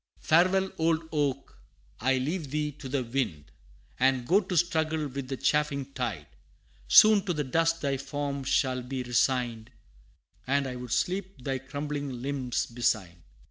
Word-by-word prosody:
Farewell, 185 +4 +3
old 160 0 +1
oak! 140 -3 -2 0.4
I 130 +2 +2
leave 150 +3 -2
thee 150 +1 -1
to 135 -1 -10
the 135 -1 0
wind, 115 - -3 0.5
And 130 -1 +2
go 190 +9 +4
to 185 -2 -3
struggle 160 -2 +1
with 135 -1 -6
the 135 0 -4
chafing 140 -2 0
tide - - -3 0.6
Soon 215 -3 +7
to 180 - 0
the 150 - -1
dust 165 +4 +1
thy 140 -2 0
form 140 0 -4
shall 130 -1 +1
be 130 +1 -4
resigned, 120 -2 0 0.8
And 140 +1 +2
I 130 -1 -4
would 125 -1 -7
sleep 185 +1 -2
thy 135 0 -2
crumbling 145 -1 -5
limbs 135 -3 -1
beside. 105 -8 -1
140 Hz, 150 wpm, -28 LUFS, 130-160 Hz, 0.8 s, Soon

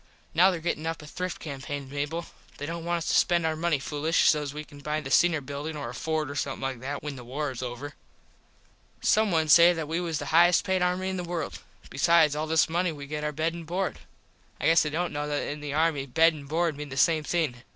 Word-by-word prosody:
Now 180 +4 +6
there 180 -3 -2
gettin 160 -1 -2
up 165 -1 -4
a - - -10
thrift 180 +4 -5
campain 140 -1 -6
Mable. 145 +5 -3 0.3
They 145 - -5
dont 165 +2 -5
want 175 0 0
us 165 - -5
to - - +1
spend 170 -2 +3
our 160 0 0
money 165 -1 +1
foolish 150 +4 +1
sos 150 -2 +2
we 150 +1 -6
can 145 -1 -14
buy 150 +2 -2
the 135 -3 -7
Singer 170 -1 +4
Buildin 145 +3 -5
or 140 -5 -5
a - - -7
Ford 155 +2 -2
or - - -5
somethin 140 -1 -3
like 135 -2 -3
that 140 +3 -5
when 145 -2 -5
the 125 - -9
war 140 +4 -3
is 125 - -7
over. 130 +3 -6 1.1
Some 215 0 +3
one 160 -2 +2
say 170 +3 +8
that 160 -3 -4
we 165 +2 -1
was 170 -3 -2
the 145 0 -5
highest 175 +1 +6
payed 190 -1 +1
army 180 +1 0
in 190 - -3
the 180 - -3
world. 175 -1 -4 0.3
Besides 165 -3 +4
all 155 +1 -2
this 160 0 +3
money 175 +2 0
we 145 -2 -8
get 150 +1 -5
our 150 - -1
bed 160 +3 -1
and 170 0 -7
board. 185 +3 -2 0.6
I - - -3
guess 165 +1 +6
they 150 - 0
dont 170 +3 -2
know 145 0 -2
that 145 -1 -2
in 150 - -4
the 145 -1 -4
army 155 -3 +1
bed 165 +5 +4
and 145 -2 -10
board 165 0 +1
mean 150 0 -7
the 130 - -7
same 155 +2 +3
thing. 155 -6 -1
155 Hz, 255 wpm, -27 LUFS, 145-170 Hz, 1.1 s, say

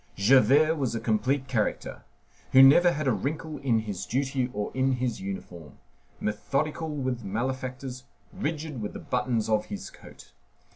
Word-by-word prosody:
Javert 135 +9 +5
was 130 -5 -1
a - - -1
complete 125 +5 0
character, 120 -5 -2 0.5
who 130 0 +9
never 175 +6 +7
had 150 -1 -2
a - - +4
wrinkle 150 - -3
in 115 -5 +1
his 105 -4 -5
duty 130 0 -1
or 105 -2 -3
in 130 +1 +1
his 125 -2 -2
uniform; 90 -4 -7 0.4
methodical 145 +9 -2
with 130 -5 -3
malefactors, 130 +4 -4 0.3
rigid 150 -4 -4
with 105 - -4
the - - -6
buttons 125 -3 -1
of 110 -1 +1
his 205 -1 -7
coat. - - -15
130 Hz, 150 wpm, -27 LUFS, 110-140 Hz, 0.5 s, who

